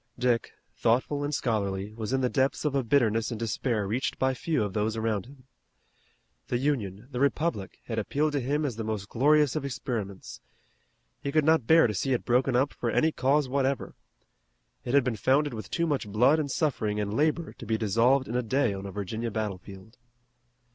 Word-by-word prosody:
Dick, 120 -2 0 0.2
thoughtful 130 +5 +1
and 145 - -2
scholarly, 105 -6 -1
was 110 0 -5
in 135 0 +1
the 125 - +2
depths 135 +2 0
of 150 - +1
a 135 -1 +1
bitterness 115 -3 +2
and 115 -3 -5
despair 115 -1 -1
reached 115 +7 -2
by 130 0 +1
few 150 -1 -1
of 100 -2 -4
those 110 +2 -1
around 110 -2 -1
him. 135 -1 -16 1.0
The 120 - 0
Union, 120 -6 -2
the 125 - -4
Republic, 140 - 0
had 115 -2 -2
appealed 150 +8 0
to 145 - 0
him 145 +4 -1
as 125 -6 -3
the 115 - -3
most 105 -2 -4
glorious 150 +2 +3
of 155 - -2
experiments. 115 - -5 0.8
He 140 - -3
could 155 0 +2
not 160 -7 +3
bear 165 0 +6
to 110 - 0
see 130 +8 0
it 125 - -2
broken 125 +1 +2
up 135 +3 +2
for 120 - -3
any 160 +7 +2
cause 140 0 +2
whatever. 135 +1 -1 0.9
It 125 - -1
had 140 - +5
been 120 -3 -2
founded 140 +6 +2
with 110 -1 -7
too 170 - 0
much 145 -8 -1
blood 125 +9 +3
and 145 -2 -2
suffering 115 -8 -1
and 105 0 -2
labor 155 +5 0
to - - -11
be 110 0 +1
dissolved 115 +6 +2
in 115 - -5
a 125 - +2
day 120 -1 +1
on 95 0 -6
a - - -6
Virginia 105 +4 -4
battlefield. 105 +1 -6
125 Hz, 200 wpm, -28 LUFS, 110-140 Hz, 1.0 s, bear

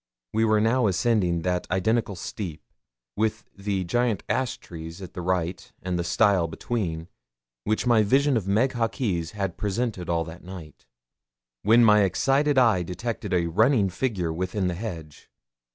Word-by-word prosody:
We 110 +1 +2
were 110 -1 +3
now 115 +2 +3
ascending 95 -4 +1
that 90 -1 -1
identical 105 +3 0
steep, 85 - -6 0.5
with 110 0 -1
the 100 -1 -2
giant 120 +4 0
ash 130 -1 -1
trees 80 +1 -9
at 95 -3 -9
the 90 - -5
right 90 0 -2
and 90 -1 -2
the - - 0
stile 90 0 +3
between, 80 -2 -3 0.6
which 110 +3 0
my 120 -3 +5
vision 135 +6 +3
of 105 -5 -1
Meg 110 +7 +2
Hawkes 110 -8 -2
had 95 -3 -2
presented 105 -3 -2
all 85 -1 +1
that 80 +1 -10
night, 85 -8 -11 0.7
when 115 +3 +5
my 105 -1 +6
excited 135 +8 +2
eye 115 -8 +4
detected 100 +4 -4
a 90 -2 +2
running 100 - +3
figure 90 -8 -1
within 95 +3 -2
the 90 - 0
hedge. 85 -7 -7
100 Hz, 155 wpm, -25 LUFS, 90-115 Hz, 0.7 s, my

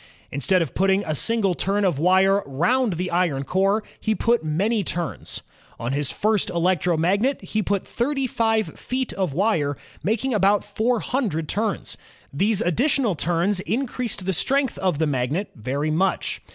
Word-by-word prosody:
Instead 165 +6 +2
of 155 - -7
putting 195 +1 +2
a 155 - -1
single 205 - +1
turn 200 +3 0
of 170 -7 +1
wire 190 +4 +4
round 190 - +1
the 180 +2 -3
iron 170 -6 +1
core, 195 +7 +1 0.2
he 220 -1 0
put 235 -2 +1
many 200 +8 0
turns. 170 -1 -4 0.4
On 120 +2 -2
his 140 -1 0
first 215 -1 +1
electromagnet 180 - +1
he 215 - -1
put 200 -1 -1
thirty 270 +3 -1
five 225 -3 0
feet 255 0 -3
of 185 -8 -2
wire, 160 - +1 0.2
making 230 +5 0
about 205 -1 +3
four 220 +3 0
himdred 200 - -1
turns. 210 +3 -2 0.4
These 205 +8 +1
additional 245 - +2
turns 175 +5 0
in 225 +9 -1
creased 235 -6 -4
the 190 - 0
strength 270 - 0
of 185 -5 0
the 160 - +1
magnet 145 +7 -1
very 140 +7 -2
much. 185 +4 0
195 Hz, 160 wpm, -23 LUFS, 165-220 Hz, 0.4 s, wire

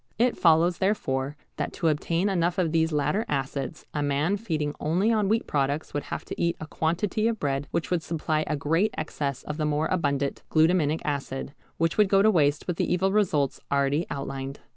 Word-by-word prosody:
It 240 +1 +2
follows, 170 +1 +4
therefore, 145 -8 0 0.2
that - - -3
to 165 - -1
obtain 165 +4 +1
enough 175 -3 +1
of 175 -4 +1
these 160 0 +2
latter 150 +8 +1
acids 140 +2 -3
a 150 - -1
man 145 +6 +1
feeding 160 -9 -2
only 180 +9 +1
on 210 -3 +2
wheat 225 +2 +1
products 145 +1 -1
would 145 - -2
have - - -5
to - - -6
eat 170 0 +1
a - - -5
quantity 175 +8 0
of 230 -2 -1
bread 140 0 -1
which 170 - -2
would 175 -2 +2
supply 155 -1 -1
a 155 - 0
great 165 +9 +1
excess 145 -3 -3
of 150 - -5
the 155 - 0
more 150 +1 +1
abundant 140 -6 0
glutaminic 160 -1 +3
acid, 140 -1 -3 0.2
which 165 +4 0
would 210 -2 +5
go 195 0 +5
to 220 - +6
waste 150 -5 +2
with 175 -2 -2
the - - 0
evil 185 +2 +2
results 165 -10 +1
already 140 +4 +1
outlined. 135 0 -5
160 Hz, 200 wpm, -26 LUFS, 145-180 Hz, 0.2 s, to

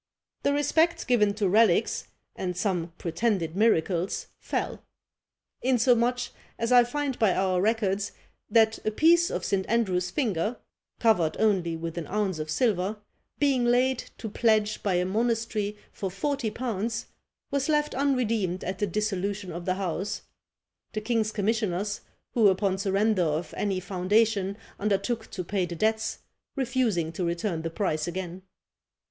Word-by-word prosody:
"The 280 - +2
respect 320 +4 +2
given 210 -5 +3
to 210 -2 +1
relics, 220 +5 +3 0.3
and 180 -1 -3
some 180 -4 -1
pretended 170 -1 -1
miracles, 190 -4 +1
fell; - - -3 0.8
insomuch, 245 -1 +2 0.3
as 230 +1 -1
I 245 -1 +8
find 280 +1 -2
by 215 -5 +3
our 185 -1 +1
records, 205 -2 +1 0.4
that 220 0 +3
a - - +1
piece 335 +9 +4
of - - -3
St. 195 -1 +1
Andrew's 185 -6 +1
finger 215 - -1 0.4
(covered 180 -9 +2
only 185 -6 +2
with 165 +1 -4
an 160 - -6
ounce 200 -5 -1
of 155 0 -4
silver), 205 +1 +1 0.4
being 275 -4 +2
laid 250 +1 +3 0.2
to 225 - -5
pledge 215 -1 +2
by 195 -3 +1
a 180 0 +2
monastery 220 0 -1
for 195 - -4
forty 265 +5 -1
pounds, 225 -1 -3 0.5
was 280 +1 0
left 300 -1 +2
unredeemed 230 -9 0
at 185 +1 -4
the 205 - +1
dissolution 200 0 -2
of 170 +1 -6
the 185 - +1
house; 195 +2 -3 0.7
the 215 - -2
king's 220 -1 0
commissioners, 205 -2 -1 0.3
who 225 -4 +5
upon 190 0 +2
surrender 200 +1 +2
of 155 0 -1
any 195 -3 0
foundation 200 +2 +1 0.2
undertook 215 +3 -1
to 185 - -4
pay 185 0 -1
the 170 - -5
debts, 220 +4 0 0.4
refusing 240 - 0
to 175 +2 -4
return 170 0 -1
the 165 - -3
price 160 -3 -1
again." 180 +1 -5
210 Hz, 145 wpm, -27 LUFS, 185-230 Hz, 0.8 s, I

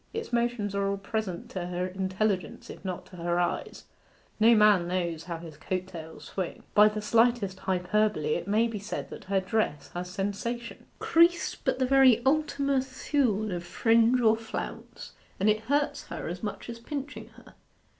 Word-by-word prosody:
Its 450 - -5
motions 235 -4 0
are 200 0 0
all 200 - -1
present 195 -2 -4
to 180 -2 -5
her 180 0 -2
intelligence 190 -1 -2
if - - -12
not 185 -2 -4
to 180 - -13
her 175 +1 0
eyes; 175 - -2 0.6
no 230 +2 +7
man 210 -5 +5
knows 170 -3 -2
how 170 -1 -4
his 165 -3 -10
coat 185 +3 -3
tails 160 -3 -10
swing. 185 -3 -5
By 210 +1 +7
the 210 0 -5
slightest 225 -4 +2
hyperbole 185 -3 +1
it - - -3
may 220 +3 +3
be 225 -3 -5
said 205 +2 -5
that - - -9
her 195 0 +1
dress 190 -7 -1
has 180 +1 -5
sensation. 205 +5 -4
Crease 340 +1 +3
but - - -2
the 260 - +1
very 255 -3 +5
Ultima 280 -1 +2
Thule 260 -5 0
of 175 -1 -3
fringe 230 +6 +3
or 220 -1 +5
flounce, 225 0 -7 0.3
and 195 - +2
it 215 - 0
hurts 285 +3 0
her - - -6
as 175 +2 -5
much 210 - -5
as 235 -1 -7
pinching 280 +4 -6
her. - - -16
210 Hz, 175 wpm, -28 LUFS, 180-235 Hz, 0.6 s, no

